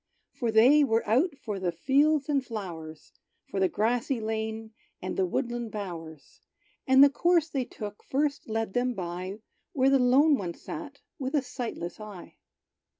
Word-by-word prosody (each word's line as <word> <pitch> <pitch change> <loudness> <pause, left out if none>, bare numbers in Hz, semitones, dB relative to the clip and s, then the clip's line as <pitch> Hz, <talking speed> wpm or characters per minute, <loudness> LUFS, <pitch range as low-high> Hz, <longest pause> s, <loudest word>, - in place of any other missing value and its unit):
For 235 -3 -2
they 255 +7 +6
were 225 -5 +1
out 280 - +2
for 210 -7 -5
the 180 -2 0
fields 280 - +2
and 280 -3 +1
flowers 170 -10 -7 0.4
For 195 - -2
the 190 -1 +3
grassy 235 +4 0
lane, 220 0 -4 0.3
and 185 - -4
the 190 - +1
woodland 240 +4 -2
bowers; 165 -8 -8 0.5
And 265 +1 +8
the 285 - +8
course 340 +1 +2
they 265 -4 -1
took 210 -3 -8
first 285 -2 -1
led 225 -2 -2
them 245 0 0
by 185 +2 -5 0.3
Where 270 0 +3
the 275 - +5
lone 270 +4 +5
one 175 -3 -4
sat 300 -3 -8 0.2
with 265 +1 -2
a 285 - +2
sightless 230 -10 -5
eye. 210 -4 -10
230 Hz, 160 wpm, -28 LUFS, 195-275 Hz, 0.5 s, And